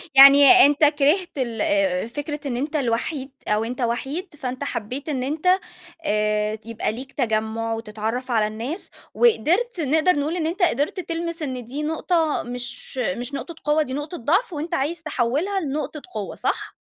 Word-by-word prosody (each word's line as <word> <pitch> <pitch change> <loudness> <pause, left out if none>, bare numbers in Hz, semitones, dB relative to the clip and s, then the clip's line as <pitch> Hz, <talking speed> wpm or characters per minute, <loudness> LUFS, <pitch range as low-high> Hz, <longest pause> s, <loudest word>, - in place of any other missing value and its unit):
يعني 280 +6 +9
أنت 290 +2 +2
كرهت 300 +4 +2
ال 235 -5 -2
آآ، 195 -1 +1
فكرة 290 +4 -5
إن 245 -3 -2
أنت 290 +5 -3
الوحيد، 265 +1 -1 0.2
أو 210 +1 +1
أنت 245 +3 -4
وحيد، 270 +9 -2
فأنت 260 -2 -4
حبّيت 265 +3 -4
إن 265 -4 -1
أنت، 300 +6 -2 0.6
آآ، 210 -1 0
يبقى 230 -2 -2
ليك 260 +5 -8
تجمُّع 225 -2 -1
وتتعرّف 225 +3 -4
على 220 -2 +3
الناس، 235 - -5 0.2
وقدرت 460 - +2
نقدر 315 +5 +3
نقول 300 +4 -1
إن 325 -3 -1
أنت 350 +4 -4
قدرت 295 +3 +1
تلمس 335 -1 -3
إن 255 -5 -4
دي 275 +6 -4
نقطة 320 0 0
مش، 245 +2 -5
مش 255 0 -2
نقطة 330 +4 -5
قوّة 300 +1 +3
دي 260 - -6
نقطة 295 +5 -4
ضعف، 365 - +1
وأنت 320 +3 -4
عايز 305 +3 -1
تحوّلها 310 +7 0
لنقطة 300 -1 -4
قوّة 205 -2 -4
صح؟ - - -2
275 Hz, 165 wpm, -23 LUFS, 235-315 Hz, 0.6 s, يعني